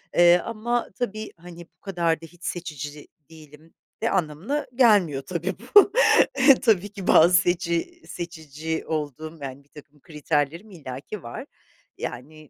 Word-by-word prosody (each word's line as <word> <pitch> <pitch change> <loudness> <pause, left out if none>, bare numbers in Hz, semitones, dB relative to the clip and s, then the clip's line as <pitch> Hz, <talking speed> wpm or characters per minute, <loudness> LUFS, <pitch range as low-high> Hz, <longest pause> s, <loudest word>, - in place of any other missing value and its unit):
eee, 175 0 +7
ama 230 +1 -2
tabii, 215 -3 -4
hani, 170 0 -12
bu - - -45
kadar 170 -4 -1
da - - -9
hiç 175 +2 -18
seçici 150 -5 -6 0.2
değilim 155 0 -16 0.3
de 230 - +2
anlamına 185 - -2
gelmiyor, 205 - +4
tabii 175 +5 -4 0.2
bu. 410 -1 +8 0.7
Tabii 205 -4 +2
ki, 195 -2 -8
bazı 170 +3 +6
seçi 175 - -2
seçici 160 -2 -6
olduğum, 155 +1 -4
yani, 135 0 -7
birtakım 145 0 -17
kriterlerim 155 +5 -2
illaki 145 +4 -8
var. 120 - -7 0.5
Yani, 155 +4 -8
165 Hz, 130 wpm, -24 LUFS, 150-190 Hz, 0.7 s, bu